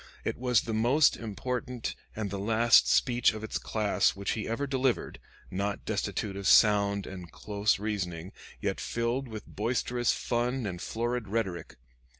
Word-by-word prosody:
It - - -1
was 125 -2 +3
the 115 - -4
most 125 +7 +4
important 125 +2 -4 0.2
and 105 -3 -3
the 100 - -3
last 115 +3 +5
speech 120 -4 +3
of 110 - -7
its 110 - -3
class 105 -2 +1
which 100 0 -2
he 110 - -3
ever 115 +5 -1
delivered 130 -2 -1 0.3
not 100 +2 -2
destitute 100 -2 -2
of 100 -1 -3
sound 100 -2 +5
and 90 -2 -9
close 105 +1 0
reasoning, 95 -4 -3 0.3
yet - - -2
filled 120 +3 -2
with 110 -2 -8
boisterous 120 +2 0
fun 125 +1 -1
and 90 -3 -4
florid 120 0 -2
rhetoric. 95 - -3
110 Hz, 155 wpm, -29 LUFS, 100-120 Hz, 0.3 s, last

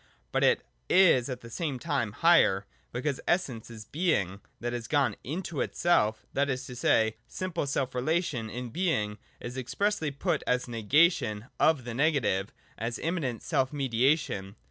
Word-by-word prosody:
But - - +1
it - - +3 0.2
is 170 -9 +5
at 125 -1 -5
the 115 - -10
same 145 0 -2
time 130 -8 -1
higher, 105 - +4 0.3
because 130 +3 -2
Essence 135 -12 0
is 110 -2 -9
Being 105 - 0 0.2
that 120 +1 -3
has 120 -2 -4
gone 145 -3 +2
into 170 +1 -3
itself: 110 -11 +1
that 140 +1 +1
is 130 0 -2
to 125 - -8
say, 110 -2 +2
the - - -30
simple 185 -6 -3
self 135 -2 -1
relation 130 -3 -1
(in 125 +2 -5
Being) 110 - 0 0.2
is 120 +2 -7
expressly 155 - 0
put 140 0 -1
as 125 0 +1
negation 120 - +2
of 155 -5 +4
the 120 0 -5
negative, 130 -8 +1 0.3
as 115 +1 -2
immanent 155 -9 -2
self 135 -5 +1
mediation. 130 -6 0
130 Hz, 160 wpm, -29 LUFS, 115-155 Hz, 0.3 s, is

